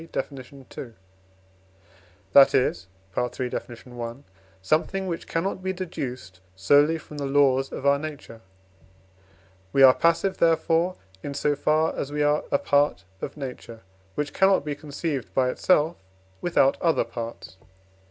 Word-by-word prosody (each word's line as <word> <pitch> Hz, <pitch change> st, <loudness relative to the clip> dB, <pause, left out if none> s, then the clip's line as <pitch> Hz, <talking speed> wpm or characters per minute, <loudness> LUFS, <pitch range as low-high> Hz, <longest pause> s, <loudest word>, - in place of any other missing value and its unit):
Def. -, -, -3 dB
ii.), 130 Hz, -2 st, -10 dB, 1.4 s
that 140 Hz, -1 st, +7 dB
is 95 Hz, -8 st, +1 dB, 0.3 s
(III. 125 Hz, +1 st, -2 dB
Def. 120 Hz, 0 st, -7 dB
i.), 120 Hz, -1 st, -6 dB, 0.4 s
something 160 Hz, -, 0 dB
which 170 Hz, -3 st, -4 dB
cannot 185 Hz, +3 st, -2 dB
be 190 Hz, 0 st, -2 dB
deduced 130 Hz, -, -6 dB, 0.2 s
solely 145 Hz, +12 st, +4 dB
from 150 Hz, -2 st, -10 dB
the 140 Hz, -, -2 dB
laws 135 Hz, -1 st, +3 dB
of 135 Hz, -, -6 dB
our 140 Hz, 0 st, +4 dB
nature. 145 Hz, -7 st, -8 dB, 1.3 s
We 135 Hz, -, +4 dB
are 130 Hz, -1 st, +9 dB
passive 170 Hz, +5 st, +1 dB
therefore, 165 Hz, +2 st, +2 dB, 0.3 s
in 140 Hz, +5 st, -6 dB
so 145 Hz, +1 st, +1 dB
far 155 Hz, +2 st, +1 dB
as 140 Hz, -, -4 dB
we 150 Hz, 0 st, 0 dB
are 150 Hz, +1 st, +2 dB
a -, -, +4 dB
part 145 Hz, -10 st, +1 dB, 0.2 s
of -, -, -6 dB
Nature, 125 Hz, -4 st, -8 dB, 0.3 s
which 150 Hz, 0 st, -3 dB
cannot 190 Hz, -5 st, +3 dB
be 150 Hz, -, -2 dB
conceived 145 Hz, -1 st, -4 dB
by 130 Hz, -1 st, +2 dB
itself 160 Hz, +1 st, +2 dB, 0.4 s
without 140 Hz, -6 st, +2 dB
other 165 Hz, -2 st, +2 dB
parts. 115 Hz, -4 st, -8 dB
145 Hz, 140 wpm, -25 LUFS, 130-160 Hz, 1.4 s, are